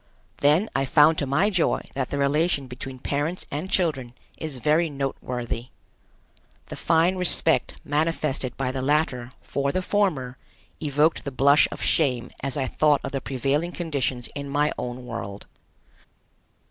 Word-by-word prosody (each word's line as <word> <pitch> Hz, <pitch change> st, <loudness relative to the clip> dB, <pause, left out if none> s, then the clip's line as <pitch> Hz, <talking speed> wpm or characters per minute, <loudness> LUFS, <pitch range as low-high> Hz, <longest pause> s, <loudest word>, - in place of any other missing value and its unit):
Then 150 Hz, +9 st, +3 dB
I 135 Hz, -, +2 dB
found 150 Hz, +3 st, +5 dB
to 140 Hz, -, -1 dB
my 170 Hz, +11 st, +2 dB
joy 180 Hz, -4 st, +1 dB
that 135 Hz, -2 st, -2 dB
the 140 Hz, -, -2 dB
relation 140 Hz, +1 st, +1 dB
between 130 Hz, +1 st, -8 dB
parents 145 Hz, +7 st, -2 dB
and 155 Hz, +7 st, -4 dB
children 135 Hz, -11 st, 0 dB, 0.2 s
is 155 Hz, -4 st, -5 dB
very 155 Hz, +6 st, +2 dB
noteworthy. 125 Hz, -4 st, -4 dB, 1.0 s
The -, -, -6 dB
fine 170 Hz, +3 st, +2 dB
respect 170 Hz, -2 st, +2 dB
manifested 150 Hz, -4 st, -1 dB
by 130 Hz, -1 st, -1 dB
the 130 Hz, 0 st, -3 dB
latter 135 Hz, -4 st, 0 dB
for 140 Hz, 0 st, -1 dB
the 185 Hz, +5 st, -1 dB
former 155 Hz, -12 st, 0 dB, 0.4 s
evoked 150 Hz, +1 st, +2 dB
the 140 Hz, -, -3 dB
blush 140 Hz, +2 st, +5 dB
of -, -, -6 dB
shame 125 Hz, -6 st, +1 dB
as 135 Hz, 0 st, -2 dB
I 135 Hz, -, 0 dB
thought 145 Hz, +2 st, +2 dB
of 135 Hz, -, -4 dB
the 135 Hz, -, -2 dB
prevailing 140 Hz, +6 st, -1 dB
conditions 135 Hz, -7 st, -2 dB
in 140 Hz, -1 st, -5 dB
my 145 Hz, +1 st, +1 dB
own 125 Hz, 0 st, -5 dB
world. 110 Hz, -4 st, -6 dB
140 Hz, 150 wpm, -25 LUFS, 130-160 Hz, 1.0 s, found